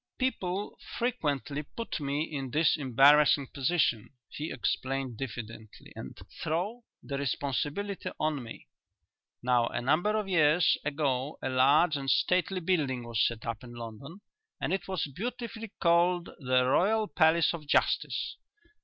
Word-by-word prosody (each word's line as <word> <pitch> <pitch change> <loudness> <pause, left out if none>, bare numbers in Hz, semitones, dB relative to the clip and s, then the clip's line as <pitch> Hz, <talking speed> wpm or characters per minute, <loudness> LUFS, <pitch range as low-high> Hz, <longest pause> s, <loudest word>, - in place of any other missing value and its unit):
"People 205 -6 -2 0.2
frequently 150 - -1
put 230 +9 -6
me 145 +1 -1
in 140 -4 -5
this 155 +5 +3
embarrassing 140 +1 +5
position," 135 -6 +1 0.2
he 155 +2 -5
explained 130 0 -2
diffidently, 115 -3 -8
"and 65 - -8 0.2
throw 205 +9 -2 0.2
the 140 -1 -4
responsibility 145 - -2
on 155 -3 0
me. 115 -2 -10 0.8
Now 120 -1 +3
a - - -3
number 160 - +2
of 210 -2 -2
years 160 -2 +4
ago 145 -1 -1
a - - -1
large 145 +5 +4
and 135 -1 -3
stately 185 +3 +2
building 150 -8 0
was 115 -2 0
set 115 -2 -1
up 115 -1 -4
in 120 -1 -10
London 120 - -9 0.4
and - - -1
it 190 -2 -2
was 190 -4 -1
beautifully 225 - -6
called 175 +1 +3
'The 130 -2 +2
Royal 210 +11 +2
Palace 160 -1 +3
of 155 -3 -7
Justice.' - - +1
150 Hz, 135 wpm, -29 LUFS, 130-180 Hz, 0.8 s, embarrassing